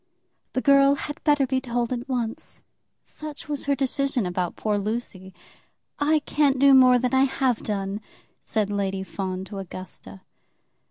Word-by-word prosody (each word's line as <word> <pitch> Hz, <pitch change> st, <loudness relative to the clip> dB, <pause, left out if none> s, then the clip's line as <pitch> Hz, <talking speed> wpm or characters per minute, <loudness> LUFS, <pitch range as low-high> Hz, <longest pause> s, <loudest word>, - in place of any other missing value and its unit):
"The 255 Hz, -, 0 dB
girl 275 Hz, 0 st, +5 dB
had 295 Hz, +2 st, -7 dB
better 290 Hz, -3 st, +3 dB
be 260 Hz, 0 st, -1 dB
told 240 Hz, -1 st, -1 dB
at 245 Hz, +1 st, -5 dB
once." 250 Hz, +3 st, -4 dB, 0.4 s
Such 305 Hz, -1 st, -9 dB
was 290 Hz, -2 st, -3 dB
her 280 Hz, 0 st, +2 dB
decision 270 Hz, -3 st, 0 dB
about 180 Hz, -1 st, -2 dB
poor 210 Hz, -1 st, -1 dB
Lucy. 200 Hz, -3 st, -4 dB, 0.7 s
"I 305 Hz, +1 st, +3 dB
can't 285 Hz, -2 st, +2 dB
do 275 Hz, +1 st, +6 dB
more 255 Hz, -1 st, +7 dB
than 250 Hz, +1 st, -1 dB
I 265 Hz, +1 st, +5 dB
have 265 Hz, -3 st, 0 dB
done," 200 Hz, 0 st, -3 dB, 0.4 s
said 210 Hz, -2 st, -1 dB
Lady 195 Hz, -1 st, -1 dB
Fawn 190 Hz, -1 st, -4 dB
to 200 Hz, 0 st, -7 dB
Augusta. 180 Hz, -, -8 dB
250 Hz, 155 wpm, -25 LUFS, 200-275 Hz, 0.7 s, more